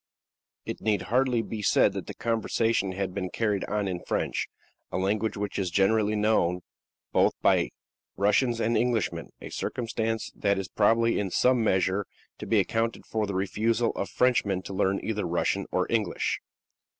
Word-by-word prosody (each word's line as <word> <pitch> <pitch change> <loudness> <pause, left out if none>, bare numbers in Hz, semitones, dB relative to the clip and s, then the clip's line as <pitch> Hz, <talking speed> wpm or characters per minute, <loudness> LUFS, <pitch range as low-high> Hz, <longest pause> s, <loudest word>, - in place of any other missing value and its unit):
It - - -5
need 105 -3 +1
hardly 125 -1 +1
be 110 -1 -5
said 105 - +4
that - - -5
the - - -7
conversation 115 -3 0
had 95 -1 -3
been 95 -2 -3
carried 105 -1 0
on 105 -1 -1
in 90 -2 -2
French, - - -1 0.4
a - - -2
language 105 +4 0
which 100 0 -3
is 95 -2 0
generally 105 +3 +2
known 105 -5 +2 0.5
both - - +3
by - - +4 0.5
Russians 115 +4 +2
and 115 +1 +1
Englishmen 120 -5 0
a - - -7
circumstance 115 -2 -2
that 100 -1 +1
is 95 -1 -3
probably 115 +2 +3
in 100 -2 -1
some 125 +5 +3
measure 95 0 +1 0.3
to - - -6
be - - +3
accounted 115 +1 -1
for 110 -1 -1
by - - -8
the 100 - -3
refusal 110 +5 +1
of 100 - -4
Frenchmen 100 -7 +1
to 95 - -7
learn 95 0 +1
either 105 -4 -2
Russian 85 +1 0
or - - +1
English. 110 -6 0
105 Hz, 170 wpm, -27 LUFS, 95-115 Hz, 0.5 s, said